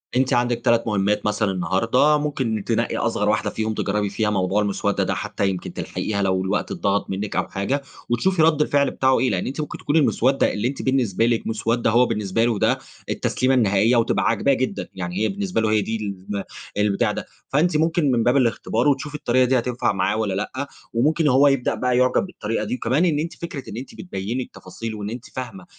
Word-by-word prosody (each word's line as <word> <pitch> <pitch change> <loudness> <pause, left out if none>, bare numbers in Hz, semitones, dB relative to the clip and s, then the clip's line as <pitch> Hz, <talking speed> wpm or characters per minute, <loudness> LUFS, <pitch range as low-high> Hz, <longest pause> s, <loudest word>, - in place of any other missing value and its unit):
أنتِ 130 0 +2
عندك 120 -1 +1
3 115 0 +4
مهمات 105 0 +1
مثلًا 105 -1 +1
النهاردة، 115 +11 +2
ممكن 130 -8 -2
تنقي - - 0
أصغر - - 0
واحدة - - +1
فيهم 110 0 -2
تجربي 105 0 -1
فيها 105 +2 0
موضوع 95 0 +1
المسودة 100 -1 0
ده، - - -1
حتى 100 - -1
يمكن 95 -2 -5
تلحقيها 100 -2 -3
لو 95 -1 +1
الوقت 95 +2 -1
أتضغط 100 0 -1
منكِ 100 +2 -3
أو - - 0
حاجة، 115 +9 -2 0.3
وتشوفي 165 +9 +1
رد 155 -1 +4
الفعل 140 -2 +2
بتاعه 130 -1 +2
إيه. 130 +1 +2
لأن 90 -5 -1
أنتِ 140 +4 -3
ممكن 150 - -5
تكون 145 - -2
المسودة 135 -3 +3
اللي 105 +3 -1
أنتِ 135 +1 -4
بالنسبة 120 -5 +1
لكِ 115 -1 0
مسودة، 115 +2 0
هو 120 +3 +5
بالنسبة 105 -2 0
له 115 -4 0
ده - - +2 0.3
التسليمة 130 +1 0
النهائية، 110 0 +3
وتبقى 115 0 +1
عاجباه 115 +5 +2
جدًا، 130 -1 -2
يعني 90 -1 -5
هي 110 - +1
بالنسبة 195 - -1
له 110 -1 +1
هي 110 -1 +3
دي 110 +2 -2
الن 100 -1 -5 0.3
البتاع 105 -1 +2
ده. - - -5 0.2
فأنتِ 155 +3 +2
ممكن 160 -2 +2
من 120 -2 +2
باب 125 +4 +3
الاختبار 120 0 +1
وتشوفي 145 +1 0
الطريقة 130 -4 +2
دي 130 0 +3
هتنفع 120 -2 -1
معاه 95 +2 0
والّا 110 -3 -1
لأ، 120 +8 -3 0.3
وممكن 150 +7 +2
هو 140 +1 +5
يبدأ 135 -3 +1
بقى 125 -1 0
يُعجب 125 +8 +3
بالطريقة 115 - -3
دي. - - -2
وكمان 130 +7 +1
إن 155 -4 +1
أنتِ 165 +2 -3
فكرة 165 -5 -5
أنتِ 130 - -8
بتبيني 120 - -4
التفاصيل، 115 -2 -8
وأن 105 -1 -5
أنتِ 120 +2 -7
فاهمة 175 +9 -6
120 Hz, 200 wpm, -22 LUFS, 105-135 Hz, 0.3 s, هو